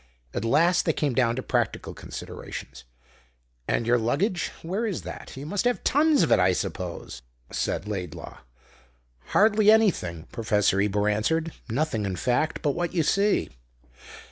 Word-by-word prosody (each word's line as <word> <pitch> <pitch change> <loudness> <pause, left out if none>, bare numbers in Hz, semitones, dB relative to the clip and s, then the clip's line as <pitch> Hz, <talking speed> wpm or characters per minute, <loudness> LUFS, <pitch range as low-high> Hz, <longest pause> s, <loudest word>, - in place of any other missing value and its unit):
At - - -2
last 170 +10 +3
they 160 - +2
came 145 -3 0
down 120 -2 +2
to 130 - -4
practical - - -1
considerations. 65 - -8 0.8
"And 115 - 0
your 120 +1 +3
luggage 170 - 0 0.2
where 195 +8 -1
is 200 - -3
that? - - -8
You 140 - -6
must 205 +8 -2
have 245 0 +1
tons 300 +1 +4
of - - 0
it, - - +6
I 90 0 +4
suppose?" 90 - -5 0.3
said 105 - -2
Laidlaw. 90 -6 -6 0.9
"Hardly 210 0 +4
anything," 185 - +3
Professor 105 -4 +1
Ebor 105 0 +1
answered. 155 +11 0 0.2
"Nothing, 115 -3 -1
in 95 - -2
fact, 125 - 0
but 145 - +2
what 175 +4 -3
you 165 - +3
see." 200 +7 +2
140 Hz, 150 wpm, -26 LUFS, -, 0.9 s, it